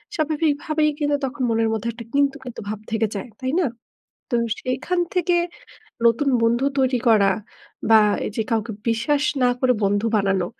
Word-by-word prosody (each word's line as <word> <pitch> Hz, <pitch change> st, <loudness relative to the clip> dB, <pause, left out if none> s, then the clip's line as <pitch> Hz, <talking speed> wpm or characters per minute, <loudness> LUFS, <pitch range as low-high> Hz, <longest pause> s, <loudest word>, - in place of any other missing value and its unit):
স্বাভাবিকভাবেই 310 Hz, -1 st, +1 dB
কিন্তু 290 Hz, -1 st, +1 dB
তখন 265 Hz, 0 st, -4 dB
মনের 225 Hz, 0 st, +1 dB
মধ্যে 220 Hz, +1 st, -3 dB
একটা 230 Hz, 0 st, -9 dB
কিন্তু, 280 Hz, 0 st, +2 dB
কিন্তু 250 Hz, -3 st, -8 dB
ভাব 215 Hz, -1 st, -4 dB
থেকে 220 Hz, 0 st, +1 dB
যায়, 200 Hz, +5 st, -5 dB
তাই 260 Hz, 0 st, -2 dB
না? 360 Hz, -, +2 dB, 0.7 s
তো -, -, -1 dB, 0.3 s
সেখান 255 Hz, +8 st, -2 dB, 0.2 s
থেকে 355 Hz, -1 st, +2 dB, 0.7 s
নতুন 235 Hz, +5 st, +3 dB
বন্ধু 235 Hz, +3 st, +2 dB
তৈরি 260 Hz, -1 st, +2 dB
করা, 205 Hz, -3 st, +5 dB, 0.6 s
বা 220 Hz, -1 st, +8 dB, 0.3 s
এই -, -, -3 dB
যে 225 Hz, -, +1 dB
কাউকে 225 Hz, 0 st, 0 dB, 0.2 s
বিশ্বাস 265 Hz, +6 st, +1 dB, 0.2 s
না 250 Hz, -, +5 dB
করে 255 Hz, -1 st, +4 dB
বন্ধু 205 Hz, +2 st, +1 dB
বানানো, 195 Hz, -3 st, +1 dB
250 Hz, 165 wpm, -22 LUFS, 225-290 Hz, 0.7 s, বা